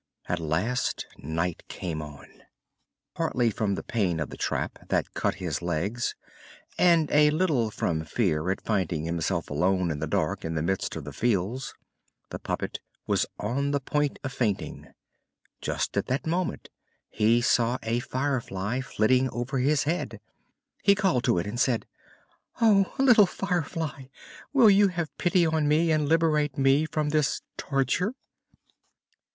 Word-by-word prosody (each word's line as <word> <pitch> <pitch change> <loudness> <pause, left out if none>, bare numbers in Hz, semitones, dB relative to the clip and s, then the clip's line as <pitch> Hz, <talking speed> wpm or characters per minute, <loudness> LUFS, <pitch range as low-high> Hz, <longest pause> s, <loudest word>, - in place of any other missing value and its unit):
At 90 - -1
last 85 +11 -1
night 85 +3 -2
came 80 -4 -4
on. 75 -1 -10 0.9
Partly 120 -2 +1
from 105 -2 -1
the - - -5
pain 95 -8 0
of 80 - -3
the - - -7
trap, - - -2
that - - 0
cut - - 0
his 90 -6 -3
legs, 90 +8 -2 0.6
and 170 -4 +4
a 150 0 +6
little 150 -8 +1
from 80 -6 -1
fear 80 -1 0
at 95 - -1
finding 90 -7 -1
himself 85 +1 -1
alone 90 +3 +1
in 75 - -3
the 80 - -2
dark - - -1
in 80 0 -3
the 75 - -1
midst 95 +3 -1
of 80 - -5
the 75 0 -8
fields, 115 - -1 0.6
the - - -5
puppet - - -3 0.3
was - - +1
on 135 +7 -1
the 140 0 +1
point 145 +1 -1
of 135 - -4
fainting. 110 -7 -2 0.7
Just - - -2
at - - 0
that 130 +3 -1
moment 175 +2 -2 0.4
he 115 +3 +3
saw 120 0 +2
a 115 +1 0
Firefly 125 -4 -2
flitting 130 +2 +2
over 120 +4 -3
his 145 +3 +2
head. 165 +4 -2 0.6
He 200 0 +5
called 190 - +1
to - - +3
it 85 - 0
and 105 +4 -4
said: 125 -3 +1 0.7
"Oh, 205 -4 +4
little 245 -7 +6
Firefly, 165 -7 -3 0.5
will 245 -7 +7
you 200 +1 +6
have 170 -4 -4
pity 175 -1 +3
on 160 -2 +1
me 160 +3 +3
and 150 -2 +1
liberate 155 -3 +2
me 135 +3 +4
from 150 0 -1
this 150 -1 +1
torture?" 140 - 0
125 Hz, 155 wpm, -27 LUFS, 95-155 Hz, 0.9 s, will